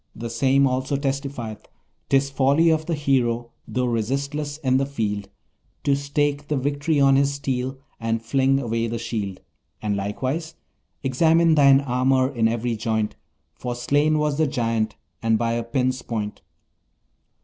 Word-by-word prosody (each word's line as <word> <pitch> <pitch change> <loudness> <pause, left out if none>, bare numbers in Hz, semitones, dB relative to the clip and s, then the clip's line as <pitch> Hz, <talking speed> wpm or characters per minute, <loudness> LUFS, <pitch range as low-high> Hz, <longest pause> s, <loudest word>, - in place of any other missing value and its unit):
The 115 +1 -5
same 135 +3 +3
also 130 +2 0
testifieth: 135 -5 -4 0.4
"'Tis 135 0 +2
folly 140 +5 +4
of 155 0 0
the 170 - 0
hero, 120 -5 0 0.2
though 125 0 -1
resistless 140 +6 -2
in 130 -1 +3
the 135 - +1
field, 105 -7 -3 0.5
To 140 - +3
stake 145 +1 -1
the 150 - 0
victory 145 +3 0
on 135 -1 +5
his 140 0 +3
steel, 130 -1 -2 0.2
and 115 0 -1
fling 135 +4 +2
away 115 -2 -1
the 115 +1 -3
shield." 110 -5 -4 0.4
And 105 -1 -1
likewise: 130 +11 -3 0.5
"Examine 160 +5 +4
thine 140 -2 +6
armour 130 0 +2
in 115 -3 +2
every 115 +1 -1
joint, 110 - -1 0.4
For 120 +8 -5
slain 145 +5 +2
was 150 -1 0
the 160 - +3
Giant, 115 -4 -1 0.3
and 115 -1 +2
by 115 +1 0
a 120 - 0
pin's 130 +1 -1
point." 105 -3 -4
130 Hz, 150 wpm, -23 LUFS, 115-140 Hz, 0.5 s, thine